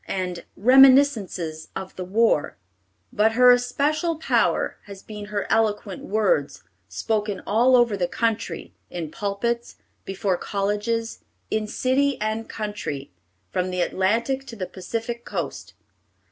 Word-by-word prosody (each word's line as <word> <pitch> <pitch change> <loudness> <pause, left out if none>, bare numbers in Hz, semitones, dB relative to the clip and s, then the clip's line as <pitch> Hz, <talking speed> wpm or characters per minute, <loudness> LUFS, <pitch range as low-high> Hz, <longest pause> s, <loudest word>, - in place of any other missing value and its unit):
_ - - -42
and 180 -2 -3
Reminiscences 245 - +4
of 190 - -6
the 185 - -5
War; 205 -3 +1 0.6
but 220 +2 +3
her 250 +1 +7
especial 285 +7 +1
power 320 - +1
has 200 -1 -11
been 210 -1 -8
her 205 -1 -3
eloquent 210 -3 0
words, 190 -9 0 0.3
spoken 210 -3 -2
all 240 +5 +4
over 240 -4 +4
the 180 -3 0
country, 225 +4 -2 0.2
in 165 -3 -5
pulpits, 230 +4 -2 0.3
before 195 -1 -1
colleges, 210 +4 -2 0.3
in 215 -1 0
city 270 +5 +1
and 215 +1 -2
country, 205 - -5 0.4
from 185 -1 -1
the 180 -1 -1
Atlantic 235 +10 0
to 235 - -8
the 190 -4 -4
Pacific 230 +6 -5
Coast. - - -5
215 Hz, 130 wpm, -24 LUFS, 190-235 Hz, 0.6 s, her